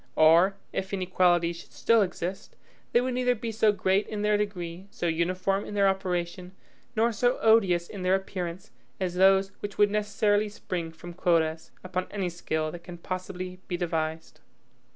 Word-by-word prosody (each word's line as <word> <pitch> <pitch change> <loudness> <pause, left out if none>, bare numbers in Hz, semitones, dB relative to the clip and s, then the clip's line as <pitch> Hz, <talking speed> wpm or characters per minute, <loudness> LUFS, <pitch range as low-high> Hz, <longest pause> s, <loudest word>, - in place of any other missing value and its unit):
Or, 170 +5 +6 0.2
if 190 0 -3
inequalities 175 -2 +2
should - - -13
still 230 -1 +3
exist, 185 -1 -4 0.4
they 240 - +4
would 255 0 -1
neither 250 0 +2
be 225 0 -4
so 220 -1 +3
great 195 0 +1
in 210 -1 -4
their 210 0 +3
degree, 190 -3 -3
so 175 - -5
uniform 185 +4 0
in 205 - -7
their 200 -1 +4
operation, 180 -1 -2 0.4
nor 230 +2 +3
so 245 +4 +1
odious 195 -6 +3
in 200 - -8
their 185 +1 +3
appearance, 185 -2 -5 0.3
as 185 -2 -1
those 190 +1 +4
which 205 -1 -6
would 205 -1 +4
necessarily 210 0 +1
spring 175 -5 -5
from 175 +2 -10
quotas, 165 -2 +1
upon 185 0 -3
any 195 -3 -2
scale 160 -2 -2
that 170 +1 -9
can 175 -1 -9
possibly 185 +1 -5
be 175 - -2
devised. 160 -2 -3
185 Hz, 170 wpm, -27 LUFS, 175-205 Hz, 0.4 s, Or